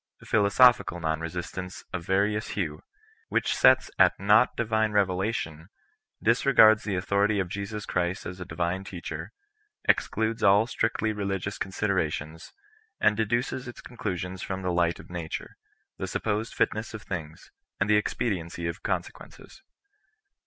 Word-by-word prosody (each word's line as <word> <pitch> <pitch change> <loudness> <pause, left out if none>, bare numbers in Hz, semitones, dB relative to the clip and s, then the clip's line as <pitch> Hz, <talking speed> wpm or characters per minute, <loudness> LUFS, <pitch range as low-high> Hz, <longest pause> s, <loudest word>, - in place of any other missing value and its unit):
Philosophical 110 -1 +4
non 80 -1 -1
resistance 90 +2 -6
of 90 -2 -3
va 95 - +1
rious 105 +1 -1
hue, 80 -7 -3 0.5
which - - +1
sets 130 0 +5
at 95 -2 +5
nought 105 +5 +4
divine 110 -2 +1
revelation, 95 -5 -1 0.6
disre 125 +4 +3
gards 110 -1 +8
the 100 -3 -2
authority 100 +3 +1
of 95 - 0
Jesus 100 +3 -5
Christ 90 +1 -1
as 90 +1 -6
a - - -4
divine 85 +3 -2
teacher^ 90 -3 -6 0.6
excludes 110 0 +1
all 100 +2 +5
strictly 110 -2 -1
religious 100 -1 -3
considerations, 80 -5 -2 0.5
and 105 - +4
deduces 120 +4 -1
its 120 - -9
conclusions 95 -5 -5
from 95 0 -4
the 90 -1 0
light 85 -1 +1
of - - -13
nature, 85 -3 -5 0.4
the - - -3
supposed 110 +1 -2
fitness 110 +1 -1
of 110 - -8
things, 80 -4 -7 0.3
and 100 - +1
the 105 - +4
expediency 90 -6 -2
of 85 - -4
consequences. - - -5
100 Hz, 140 wpm, -27 LUFS, 90-110 Hz, 0.6 s, gards